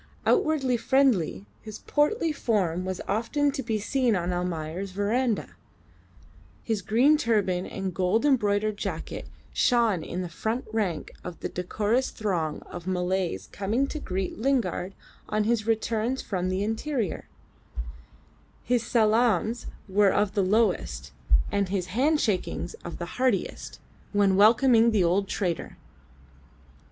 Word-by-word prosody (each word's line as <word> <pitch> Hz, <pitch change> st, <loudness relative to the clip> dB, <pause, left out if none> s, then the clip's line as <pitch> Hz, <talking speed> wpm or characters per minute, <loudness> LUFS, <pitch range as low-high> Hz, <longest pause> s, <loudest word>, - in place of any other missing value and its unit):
Outwardly 270 Hz, -6 st, +2 dB
friendly, 230 Hz, -, +2 dB, 0.2 s
his 215 Hz, -1 st, -8 dB
portly 320 Hz, +4 st, +1 dB
form 185 Hz, -, 0 dB
was 185 Hz, -1 st, -3 dB
often 235 Hz, +8 st, +1 dB
to 275 Hz, -, -3 dB
be 225 Hz, -3 st, -1 dB
seen 240 Hz, +2 st, +1 dB
on 180 Hz, 0 st, -1 dB
Almayer's 175 Hz, +1 st, -3 dB
verandah; 220 Hz, +4 st, 0 dB, 1.1 s
his 220 Hz, -3 st, -1 dB
green 240 Hz, +10 st, +4 dB
turban 200 Hz, -, +1 dB
and 190 Hz, -1 st, -4 dB
gold 190 Hz, +8 st, +1 dB
embroidered 215 Hz, -6 st, +2 dB
jacket -, -, -5 dB, 0.3 s
shone 230 Hz, -8 st, +3 dB
in 180 Hz, +3 st, -4 dB
the -, -, -4 dB
front 220 Hz, +8 st, -3 dB
rank 195 Hz, -8 st, -1 dB
of 180 Hz, -1 st, -7 dB
the -, -, -3 dB
decorous 215 Hz, +8 st, 0 dB
throng 175 Hz, -8 st, -2 dB
of 175 Hz, 0 st, -9 dB
Malays 180 Hz, -, -1 dB
coming 215 Hz, +7 st, 0 dB
to 305 Hz, -, -4 dB
greet 190 Hz, -5 st, -3 dB
Lingard 220 Hz, -7 st, 0 dB, 0.3 s
on 215 Hz, 0 st, +1 dB
his 220 Hz, 0 st, 0 dB
returns 225 Hz, +3 st, 0 dB
from 185 Hz, -2 st, -2 dB
the 185 Hz, +2 st, 0 dB
interior; 225 Hz, -, -2 dB, 1.4 s
his 245 Hz, -2 st, +1 dB
salaams 225 Hz, -1 st, +2 dB, 0.2 s
were 200 Hz, +1 st, +4 dB
of 205 Hz, 0 st, +1 dB
the 200 Hz, -, +2 dB
lowest, 190 Hz, -, +1 dB, 0.4 s
and 200 Hz, -2 st, 0 dB
his 190 Hz, -2 st, -1 dB
hand 295 Hz, +7 st, +3 dB
shakings 210 Hz, -, -1 dB
of -, -, -6 dB
the -, -, -4 dB, 0.2 s
heartiest, 255 Hz, -7 st, -1 dB, 0.3 s
when 200 Hz, -2 st, +3 dB
welcoming 230 Hz, +3 st, +6 dB
the 210 Hz, -5 st, +3 dB
old 185 Hz, +4 st, +2 dB
trader. 180 Hz, -5 st, -3 dB
210 Hz, 130 wpm, -27 LUFS, 185-235 Hz, 1.4 s, welcoming